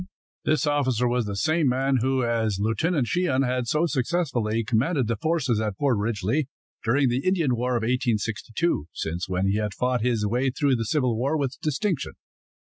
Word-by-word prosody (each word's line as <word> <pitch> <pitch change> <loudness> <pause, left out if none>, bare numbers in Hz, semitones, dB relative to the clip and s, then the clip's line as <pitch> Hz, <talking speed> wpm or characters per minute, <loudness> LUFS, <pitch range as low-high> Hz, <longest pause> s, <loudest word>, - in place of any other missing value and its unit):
This 155 -1 +2
officer 130 -5 +1
was 120 -1 0
the 100 - -3
same 155 +9 +1
man 135 +1 +2
who, 130 +1 +1
as 115 -4 0
Lieutenant 120 - +1
Sheehan, 140 -3 +1
had 125 -1 -1
so 155 +7 +2
successfully 130 -7 0
commanded 125 +6 +1
the 115 +1 -1
forces 130 -4 0
at 105 -3 -2
Fort 140 -4 +2
Ridgely, 110 +6 -1 0.4
during 135 +4 +2
the 125 +2 0
Indian 170 -9 +2
War 125 +1 -1
of - - -2
1862, 115 - -1
since 85 +4 -4
when 90 +1 0
he 100 +2 +1
had 105 -2 -2
fought 125 -1 0
his 115 -3 +1
way 125 +5 +1
through 135 +1 +1
the 115 -2 -2
Civil 125 -1 +1
War 135 +7 0
with 135 -3 -2
distinction. 155 +2 -1
125 Hz, 180 wpm, -25 LUFS, 110-140 Hz, 0.4 s, This